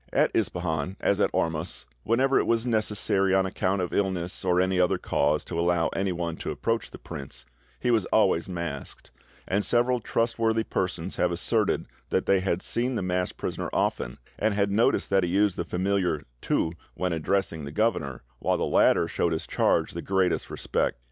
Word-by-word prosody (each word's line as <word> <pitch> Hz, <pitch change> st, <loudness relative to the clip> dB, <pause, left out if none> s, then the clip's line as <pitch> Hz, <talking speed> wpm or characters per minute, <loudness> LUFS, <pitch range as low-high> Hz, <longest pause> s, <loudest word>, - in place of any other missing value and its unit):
"At -, -, +2 dB
Ispahan, 85 Hz, 0 st, -1 dB
as 100 Hz, +1 st, +1 dB
at -, -, +3 dB
Ormus, 80 Hz, -2 st, -2 dB, 0.2 s
whenever 130 Hz, -, +2 dB
it -, -, 0 dB
was 115 Hz, 0 st, +2 dB
necessary 105 Hz, -4 st, +2 dB
on 95 Hz, 0 st, +3 dB
account 95 Hz, 0 st, 0 dB
of 90 Hz, -, -4 dB
illness 95 Hz, -3 st, -1 dB
or 90 Hz, -1 st, +2 dB
any 95 Hz, 0 st, +2 dB
other 90 Hz, -, +3 dB
cause 75 Hz, +1 st, +1 dB
to 85 Hz, -, -4 dB
allow 85 Hz, -1 st, +2 dB
anyone 85 Hz, -4 st, -2 dB
to -, -, -5 dB
approach 115 Hz, -1 st, -1 dB
the -, -, -10 dB
prince, 65 Hz, -3 st, -8 dB, 0.3 s
he 125 Hz, -, +1 dB
was 110 Hz, -5 st, +2 dB
always 95 Hz, -5 st, +2 dB
masked; 85 Hz, -6 st, -6 dB, 0.4 s
and 100 Hz, +2 st, +1 dB
several 120 Hz, +1 st, +2 dB
trustworthy 115 Hz, -1 st, 0 dB
persons 90 Hz, -3 st, -3 dB
have 90 Hz, -, +2 dB
asserted 105 Hz, +5 st, +1 dB, 0.2 s
that -, -, +1 dB
they 100 Hz, -, +4 dB
had 95 Hz, -1 st, -1 dB
seen 125 Hz, +2 st, 0 dB
the 105 Hz, -, -1 dB
masked 90 Hz, 0 st, -1 dB
prisoner -, -, -3 dB
often, -, -, -1 dB, 0.2 s
and 110 Hz, -1 st, +1 dB
had 100 Hz, -1 st, +1 dB
noticed 110 Hz, 0 st, +2 dB
that 95 Hz, -1 st, +4 dB
he 90 Hz, -, 0 dB
used 100 Hz, +1 st, +2 dB
the -, -, -2 dB
familiar 90 Hz, -4 st, 0 dB, 0.2 s
'tu' 80 Hz, -, 0 dB, 0.2 s
when 90 Hz, -1 st, -1 dB
addressing 80 Hz, -1 st, -1 dB
the 70 Hz, -, -6 dB
governor, 80 Hz, -, -1 dB, 0.2 s
while -, -, +1 dB
the -, -, 0 dB
latter -, -, +4 dB
showed 85 Hz, -, 0 dB
his 80 Hz, -, -3 dB
charge -, -, +1 dB
the -, -, -5 dB
greatest 95 Hz, -2 st, 0 dB
respect. -, -, -1 dB
95 Hz, 180 wpm, -27 LUFS, 85-105 Hz, 0.4 s, they